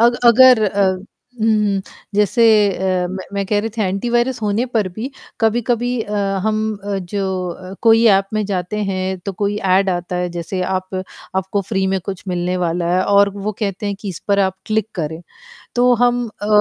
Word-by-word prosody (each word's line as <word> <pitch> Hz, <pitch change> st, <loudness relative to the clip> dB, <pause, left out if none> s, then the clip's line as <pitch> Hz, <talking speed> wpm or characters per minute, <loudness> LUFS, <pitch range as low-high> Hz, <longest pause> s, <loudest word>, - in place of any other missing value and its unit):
अग 240 Hz, +1 st, +4 dB
अगर 245 Hz, -1 st, +7 dB
अ, 200 Hz, 0 st, +1 dB, 0.6 s
हुँ, 210 Hz, -3 st, +2 dB, 0.3 s
जैसे 210 Hz, +3 st, +2 dB, 0.3 s
अ, 185 Hz, -1 st, 0 dB
मैं 190 Hz, 0 st, -5 dB
मैं 200 Hz, 0 st, -1 dB
कह 210 Hz, 0 st, +1 dB
रही 225 Hz, -, -3 dB
थी 220 Hz, -, +1 dB
एंटीवायरस 240 Hz, +6 st, 0 dB
होने 210 Hz, +3 st, +1 dB
पर 220 Hz, -6 st, 0 dB
भी 220 Hz, +9 st, -6 dB, 0.3 s
कभी-कभी 240 Hz, +2 st, +1 dB
अ, 210 Hz, -, -8 dB, 0.3 s
हम 215 Hz, 0 st, +1 dB, 0.5 s
जो 200 Hz, -1 st, -1 dB, 0.3 s
अ, 185 Hz, +2 st, -9 dB
कोई 225 Hz, 0 st, +5 dB
ऐप 195 Hz, -1 st, +4 dB
में 215 Hz, -1 st, 0 dB
जाते 185 Hz, 0 st, -3 dB
हैं, 190 Hz, -1 st, -2 dB
तो 195 Hz, +2 st, -5 dB
कोई 205 Hz, +2 st, -1 dB
ऐड 190 Hz, 0 st, +2 dB
आता 175 Hz, 0 st, -3 dB
है, 180 Hz, 0 st, -1 dB
जैसे 175 Hz, +2 st, -4 dB
आप 185 Hz, 0 st, -3 dB, 0.4 s
आपको 190 Hz, +2 st, 0 dB
फ्री 190 Hz, -3 st, 0 dB
में 190 Hz, 0 st, +1 dB
कुछ 190 Hz, -3 st, -5 dB
मिलने 180 Hz, 0 st, -1 dB
वाला 175 Hz, -1 st, -1 dB
है, 185 Hz, -, +3 dB
और 200 Hz, 0 st, +4 dB
वो 205 Hz, +2 st, -3 dB
कहते 205 Hz, -1 st, -2 dB
हैं 200 Hz, -, -1 dB
कि 205 Hz, -, -5 dB
इस 175 Hz, -, -5 dB
पर 200 Hz, 0 st, +3 dB
आप 190 Hz, -1 st, +1 dB
क्लिक 220 Hz, -1 st, 0 dB
करें। 160 Hz, -2 st, -4 dB, 0.6 s
तो 245 Hz, +1 st, +4 dB
हम 245 Hz, 0 st, +2 dB, 0.2 s
अ, 205 Hz, -, -3 dB
200 Hz, 190 wpm, -19 LUFS, 185-220 Hz, 0.6 s, अगर